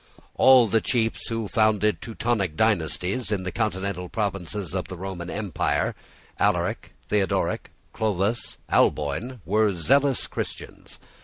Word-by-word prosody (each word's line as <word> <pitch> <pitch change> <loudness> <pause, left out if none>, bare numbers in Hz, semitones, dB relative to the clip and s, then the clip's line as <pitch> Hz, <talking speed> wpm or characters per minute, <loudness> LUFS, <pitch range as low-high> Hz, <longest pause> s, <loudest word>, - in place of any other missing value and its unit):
All 130 -3 +6
the 110 +1 +2
chiefs 115 -3 0
who 115 -2 -2
founded 105 -4 +2
Teutonic 110 -7 -1
dynasties 100 - +1
in 100 -3 -1
the 90 - -3
continental 100 -4 -2
provinces 100 -3 -3
of 95 -2 -2
the 95 - -7
Roman 90 -1 -6
empire, 100 -4 -1 0.5
Alaric, - - 0 0.2
Theodoric, 100 -3 0 0.2
Clovis, 105 +2 -1
Alboin, 80 - +1
were 105 +3 +2
zealous 135 - +2
Christians. - - -7
105 Hz, 120 wpm, -25 LUFS, 90-115 Hz, 0.5 s, All